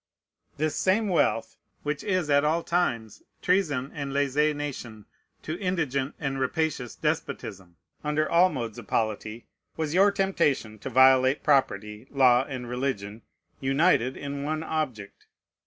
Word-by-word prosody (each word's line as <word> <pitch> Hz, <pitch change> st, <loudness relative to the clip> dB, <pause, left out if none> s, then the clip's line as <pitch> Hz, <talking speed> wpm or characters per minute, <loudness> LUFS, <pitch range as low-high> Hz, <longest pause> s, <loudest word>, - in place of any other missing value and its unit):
" -, -, -43 dB
This 155 Hz, 0 st, -1 dB
same 205 Hz, +3 st, +2 dB
wealth, 150 Hz, -9 st, +1 dB, 0.3 s
which 150 Hz, -1 st, -3 dB
is 185 Hz, -5 st, 0 dB
at 145 Hz, -1 st, +4 dB
all 160 Hz, +3 st, +1 dB
times 120 Hz, -, -1 dB, 0.2 s
treason 155 Hz, -8 st, +1 dB
and 140 Hz, -3 st, -4 dB
lèze 145 Hz, +2 st, +1 dB
nation 125 Hz, -7 st, -6 dB, 0.4 s
to 155 Hz, +3 st, -4 dB
indigent 145 Hz, -8 st, -1 dB
and 135 Hz, -3 st, -2 dB
rapacious 135 Hz, -2 st, -1 dB
despotism, 95 Hz, -3 st, -4 dB, 0.3 s
under 150 Hz, +1 st, 0 dB
all 175 Hz, +2 st, +5 dB
modes 120 Hz, -, -5 dB
of 110 Hz, -, -12 dB
polity, 110 Hz, +1 st, -2 dB, 0.3 s
was 160 Hz, -1 st, -2 dB
your 195 Hz, +3 st, +6 dB
temptation 150 Hz, -, 0 dB
to 135 Hz, -, -6 dB
violate 130 Hz, +2 st, +5 dB
property, 110 Hz, -6 st, +1 dB
law, 130 Hz, -2 st, +4 dB
and 130 Hz, -4 st, -6 dB
religion, 120 Hz, -4 st, -3 dB, 0.4 s
united 135 Hz, -2 st, +2 dB
in 140 Hz, 0 st, -5 dB
one 155 Hz, +2 st, -2 dB
object. 130 Hz, -12 st, -4 dB
140 Hz, 140 wpm, -27 LUFS, 125-155 Hz, 0.4 s, your